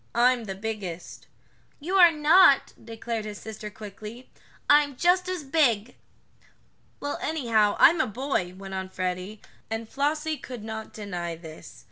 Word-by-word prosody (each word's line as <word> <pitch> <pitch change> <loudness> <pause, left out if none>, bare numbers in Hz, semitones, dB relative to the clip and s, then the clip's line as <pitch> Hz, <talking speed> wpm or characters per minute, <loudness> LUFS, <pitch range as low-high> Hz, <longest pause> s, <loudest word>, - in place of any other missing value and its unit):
"I'm 245 0 +3
the 195 -2 -5
biggest." 195 -5 -6 0.5
"You 335 +6 -5
are 350 -2 +8
not!" 305 0 +5
declared 225 0 -5
his 210 -1 -6
sister 215 -1 -8
quickly. 210 +4 -10 0.4
"I'm 290 -1 +4
just 360 +5 +2
as 365 -4 -3
big." 255 -7 +1 1.0
"Well, 285 0 -4
anyhow, 230 -9 +1
I'm 330 0 +6
a - - 0
boy," 215 -6 -2
went 195 0 -9
on 190 0 -4
Freddie, 185 +3 -4 0.3
and 225 0 -4
Flossie 300 +4 -1
could 245 -6 -9
not 220 0 -6
deny 175 -5 -5
this. 160 -1 -12
225 Hz, 140 wpm, -26 LUFS, 205-290 Hz, 1.0 s, are